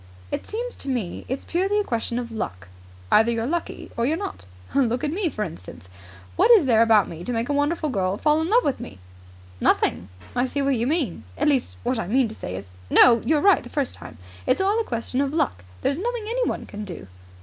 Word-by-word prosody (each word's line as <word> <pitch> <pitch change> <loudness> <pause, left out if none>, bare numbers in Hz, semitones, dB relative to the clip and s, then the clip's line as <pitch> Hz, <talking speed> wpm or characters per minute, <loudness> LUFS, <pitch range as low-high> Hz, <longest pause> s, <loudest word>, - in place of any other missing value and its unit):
"It - - -3
seems 480 +3 -4
to - - -10
me 230 -9 -3
it's 265 +2 -3
purely 390 +4 +1
a - - +1
question 235 - -2
of 240 -1 -4
luck. 90 - -5 0.4
Either 225 +2 +5
you're 230 -1 -1
lucky 335 +5 -3
or 235 - -1
you're 315 +3 +1
not. 390 - -6 0.3
Look 245 -3 +1
at 295 - 0
me, 360 +1 0
for 215 -7 -3
instance. 90 - -9 0.5
What - - +4
is 440 -10 +7
there 230 -4 +4
about 225 -3 +5
me 170 +1 -8
to 245 - -3
make 230 +1 -1
a - - +1
wonderful 300 +2 0
girl 190 -3 -1
love 320 - +3
me?" 95 - -8 0.6
"Nothing! 90 - +1 0.3
I 245 +1 +2
see 280 +2 -1
what 275 -1 +2
you 235 +1 0
mean. 275 - -1
At - - +1
least, 270 -4 +1
what 245 -1 0
I 200 - -3
mean 250 +4 +3
to - - -8
say 90 - -6
is 95 0 -8
" 90 - -22
"No. 235 -2 +8
You 315 - +2
were 295 - +2
right 395 -1 +5
the - - -11
first 280 -4 -1
time. 80 - -11 0.3
It's - - +3
all 400 +3 +2
a - - +1
question 245 - -2
of 280 0 -1
luck. 95 - 0 0.2
There's 280 +3 +1
nothing 475 +1 -2
anyone 485 +3 -1
can 210 0 -7
do." 175 - -7
255 Hz, 225 wpm, -24 LUFS, 215-320 Hz, 0.6 s, No